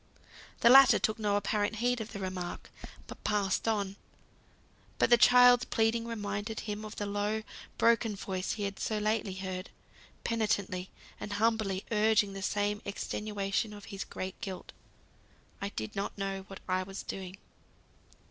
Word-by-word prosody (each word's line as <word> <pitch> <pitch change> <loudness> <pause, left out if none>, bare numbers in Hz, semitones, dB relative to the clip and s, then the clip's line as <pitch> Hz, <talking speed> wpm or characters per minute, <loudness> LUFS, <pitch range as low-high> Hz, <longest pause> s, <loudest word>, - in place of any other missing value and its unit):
The 235 - +7
latter 270 0 +9
took 215 +1 0
no 205 -2 +1
apparent 205 +1 0
heed 245 +1 0
of 220 - -7
the - - -6
remark, 185 -2 -5 0.3
but - - -11
passed 205 0 0
on. 200 -3 0 1.0
But - - +2
the - - +10
child's 245 +2 +7
pleading 230 +1 +1
reminded 210 -1 -3
him 210 0 -5
of 215 0 -7
the 205 - -3
low, 205 +2 -1 0.3
broken 230 -2 +3
voice 190 -1 -3
he 210 - -4
had 200 0 -3
so 215 - -1
lately 210 -2 0
heard, 185 0 -5 0.5
penitently 205 -5 -1 0.3
and 205 - -5
humbly 210 -3 +1
urging 210 -2 +3
the 195 - -6
same 205 +1 0
extenuation 205 +1 -2
of 205 -1 -10
his 195 - -3
great 185 +3 -6
guilt. 190 -5 -6 0.9
"I 200 - -2
did 110 - -6
not 200 +1 -3
know 195 -1 -3
what 195 -1 -10
I 185 0 +1
was 195 +1 -6
doing." 190 0 -6
205 Hz, 155 wpm, -31 LUFS, 195-220 Hz, 1.0 s, the